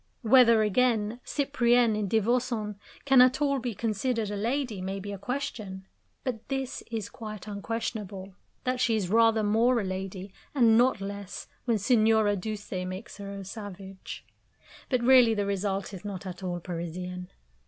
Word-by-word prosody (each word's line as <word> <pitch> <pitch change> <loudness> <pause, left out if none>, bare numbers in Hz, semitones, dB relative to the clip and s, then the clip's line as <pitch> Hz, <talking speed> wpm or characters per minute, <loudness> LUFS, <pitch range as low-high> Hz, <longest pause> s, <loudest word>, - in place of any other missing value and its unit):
Whether, 230 -1 +6
again, 220 +1 +1
Cyprienne, 245 -5 +2
in 210 -1 -1
Divorcons, 225 0 +1 0.3
can 270 -2 +7
at 255 +1 +5
all 280 -2 +2
be 240 -3 -4
considered 225 +1 -1
a - - -3
lady 235 -1 -1
may 190 +1 -3
be 205 +1 -6
a 200 - -6
question; 205 -6 -4 0.4
but 240 -4 -4
this 270 -2 -3
is 220 -3 -3
quite 215 -3 -8
unquestionable 205 -2 -4 0.3
that 255 0 -1
she 235 -3 +2
is 195 -4 -1
rather 225 -1 +4
more 230 +4 +3
a - - -1
lady, 190 0 -5 0.2
and 230 -5 +5
not 245 -2 +3
less, 200 0 -6 0.2
when 235 -3 +2
Signora 220 -1 +3
Duse 210 +2 -5
makes 185 +1 -5
her 200 -1 -7
a 200 -1 -7
savage. 195 -1 -8 0.6
But 255 -3 +1
really 245 -3 +6
the 205 -1 0
result 200 0 -2
is 190 -1 -8
not 200 -2 -6
at 185 0 -7
all 175 -2 -3
Parisian. 180 +1 -5
215 Hz, 160 wpm, -28 LUFS, 195-240 Hz, 0.6 s, can